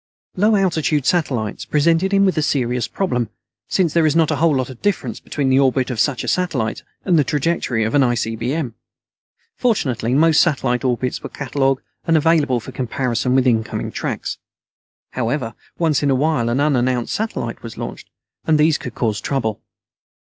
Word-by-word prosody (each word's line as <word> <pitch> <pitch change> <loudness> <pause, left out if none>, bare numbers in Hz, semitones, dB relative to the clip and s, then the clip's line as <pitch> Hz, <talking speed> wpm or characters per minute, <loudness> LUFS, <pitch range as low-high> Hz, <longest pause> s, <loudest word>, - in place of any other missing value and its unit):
Low 210 +3 +3
altitude 160 -7 +1
satellites 130 - 0
presented 165 +5 +2
him 200 0 +4
with 190 - +2
a 155 - +1
serious 125 -5 0
problem, 125 - -1 0.4
since 170 -5 +1
there 165 -2 +4
is 150 - +1
not 165 -2 +3
a - - 0
whole 160 -2 +3
lot 130 0 -1
of 125 - -13
difference 205 -3 -1
between 140 -3 -2
the 130 +1 +4
orbit 130 -1 +2
of 120 - -4
such 130 +2 +1
a - - -6
satellite 140 -12 -1 0.2
and 175 -4 +4
the - - +4
trajectory 140 -5 0
of 110 - -1
an 145 - +4
ICBM. 120 +2 -1 0.8
Fortunately 130 - 0
most 160 +1 +5
satellite 135 -6 +1
orbits 125 0 -1
were - - -7
catalogued 135 -1 -1 0.2
and 165 -1 +4
available 150 -5 +2
for - - -9
comparison 125 0 -1
with 130 -1 +3
incoming 115 -3 0
tracks. - - -4 0.7
However, 120 -1 -2 0.2
once 160 -4 +1
in 145 - +1
a 135 - +3
while 135 -4 +1
an 120 +3 0
unannounced 130 -4 +1
satellite 210 - -3
was 115 -1 -9
launched, - - -7 0.4
and 155 -1 +4
these 155 0 +3
could 120 - -7
cause 110 -4 -1
trouble. 110 -6 -2
135 Hz, 175 wpm, -20 LUFS, 120-160 Hz, 0.8 s, most